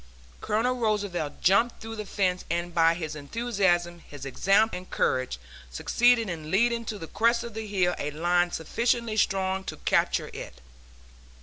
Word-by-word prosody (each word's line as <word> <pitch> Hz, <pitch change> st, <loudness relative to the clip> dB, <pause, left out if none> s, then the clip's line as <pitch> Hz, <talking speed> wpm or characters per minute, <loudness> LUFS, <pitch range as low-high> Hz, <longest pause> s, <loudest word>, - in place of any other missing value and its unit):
Colonel 230 Hz, +4 st, 0 dB
Roosevelt 205 Hz, -9 st, -2 dB
jumped 230 Hz, +6 st, +3 dB
through 225 Hz, 0 st, -7 dB
the 210 Hz, -1 st, -5 dB
fence 185 Hz, -2 st, 0 dB
and 175 Hz, +1 st, -2 dB
by 165 Hz, 0 st, +4 dB
his 155 Hz, -3 st, -5 dB
enthusiasm, 175 Hz, 0 st, 0 dB
his 145 Hz, -4 st, -10 dB
example 195 Hz, -, +2 dB
and 180 Hz, 0 st, -11 dB
courage 130 Hz, -, 0 dB, 0.3 s
succeeded 235 Hz, -, +2 dB
in 160 Hz, -4 st, -5 dB
leading 235 Hz, +5 st, +2 dB
to 215 Hz, -, -4 dB
the 165 Hz, -, -7 dB
crest 235 Hz, +7 st, +1 dB
of 235 Hz, -2 st, -7 dB
the 220 Hz, 0 st, -5 dB
hill 185 Hz, -3 st, +1 dB
a 145 Hz, -, -2 dB
line 175 Hz, +3 st, +1 dB
sufficiently 230 Hz, +7 st, -1 dB
strong 190 Hz, -2 st, +1 dB
to -, -, -6 dB
capture -, -, +1 dB
it. -, -, -8 dB
190 Hz, 160 wpm, -27 LUFS, 170-225 Hz, 0.3 s, by